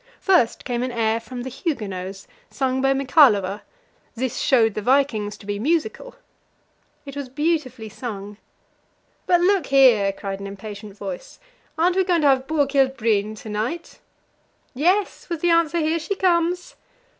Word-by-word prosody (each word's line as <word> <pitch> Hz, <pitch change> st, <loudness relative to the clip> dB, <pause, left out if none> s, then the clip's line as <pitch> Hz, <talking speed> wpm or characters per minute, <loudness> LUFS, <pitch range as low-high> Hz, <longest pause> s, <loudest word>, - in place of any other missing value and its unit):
First 360 Hz, -, +2 dB
came 245 Hz, -2 st, -2 dB
an 255 Hz, 0 st, -2 dB
air 225 Hz, -1 st, 0 dB
from 245 Hz, +2 st, -8 dB
"The 260 Hz, -, -5 dB
Huguenots," 195 Hz, -, -4 dB, 0.2 s
sung 260 Hz, -1 st, -1 dB
by 270 Hz, 0 st, +3 dB
Michalowa; 250 Hz, -, +3 dB, 0.5 s
this 255 Hz, 0 st, -3 dB
showed 225 Hz, -5 st, +3 dB
the 215 Hz, -, -4 dB
vikings 235 Hz, -4 st, +1 dB
to -, -, -15 dB
be 205 Hz, 0 st, -3 dB
musical. 340 Hz, -, -1 dB, 0.9 s
It 275 Hz, -1 st, -9 dB
was 280 Hz, -2 st, -5 dB
beautifully 280 Hz, -5 st, -2 dB
sung. 205 Hz, -2 st, -7 dB, 0.9 s
"But 350 Hz, -1 st, +4 dB
look 370 Hz, -4 st, +2 dB
here," 245 Hz, -8 st, +5 dB
cried 195 Hz, 0 st, -6 dB
an 200 Hz, -, -6 dB
impatient 205 Hz, +1 st, -9 dB
voice: 195 Hz, -3 st, -7 dB, 0.4 s
"aren't 350 Hz, +3 st, +2 dB
we 380 Hz, -, +4 dB
going 350 Hz, -3 st, +1 dB
to 295 Hz, -, +4 dB
have 265 Hz, 0 st, +2 dB
Borghild 275 Hz, -3 st, +1 dB
Bryhn 215 Hz, -2 st, 0 dB
to 220 Hz, -, -8 dB
night?" 225 Hz, +11 st, -4 dB, 0.7 s
"Yes," 360 Hz, +11 st, 0 dB
was 335 Hz, -3 st, -3 dB
the 345 Hz, -, +3 dB
answer; 335 Hz, 0 st, +2 dB
"here 320 Hz, +1 st, +1 dB
she 335 Hz, +5 st, -3 dB
comes." 355 Hz, -1 st, +1 dB
260 Hz, 155 wpm, -22 LUFS, 215-325 Hz, 0.9 s, here